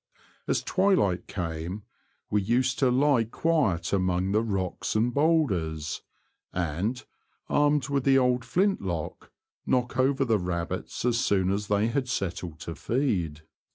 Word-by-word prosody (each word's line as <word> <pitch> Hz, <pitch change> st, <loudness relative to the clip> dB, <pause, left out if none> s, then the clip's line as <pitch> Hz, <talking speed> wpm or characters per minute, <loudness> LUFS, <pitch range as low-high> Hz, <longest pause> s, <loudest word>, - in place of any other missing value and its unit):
As -, -, 0 dB
twilight 185 Hz, -, +2 dB
came 85 Hz, +2 st, -4 dB, 0.5 s
we 105 Hz, -, +2 dB
used 125 Hz, +5 st, +1 dB
to 130 Hz, -, +4 dB
lie 130 Hz, -1 st, +3 dB
quiet 115 Hz, -, 0 dB
among 95 Hz, 0 st, +1 dB
the 105 Hz, +2 st, +3 dB
rocks 95 Hz, -5 st, -2 dB
and 115 Hz, +3 st, +2 dB
boulders, 95 Hz, -, +1 dB, 0.5 s
and, 90 Hz, +8 st, -2 dB, 0.4 s
armed 145 Hz, -2 st, +2 dB
with 140 Hz, -2 st, 0 dB
the 135 Hz, 0 st, +5 dB
old 125 Hz, -1 st, +2 dB
flint 195 Hz, +7 st, +1 dB
lock, 85 Hz, -5 st, -4 dB, 0.4 s
knock 125 Hz, 0 st, 0 dB
over 135 Hz, +1 st, +3 dB
the 110 Hz, -4 st, +2 dB
rabbits 85 Hz, +4 st, -3 dB
as 120 Hz, -1 st, +2 dB
soon 95 Hz, -5 st, +2 dB
as 100 Hz, +1 st, -2 dB
they 105 Hz, +2 st, +2 dB
had 130 Hz, 0 st, -1 dB
settled 90 Hz, -7 st, -3 dB
to 85 Hz, -, -5 dB
feed. 85 Hz, -, -1 dB
110 Hz, 140 wpm, -27 LUFS, 90-130 Hz, 0.5 s, the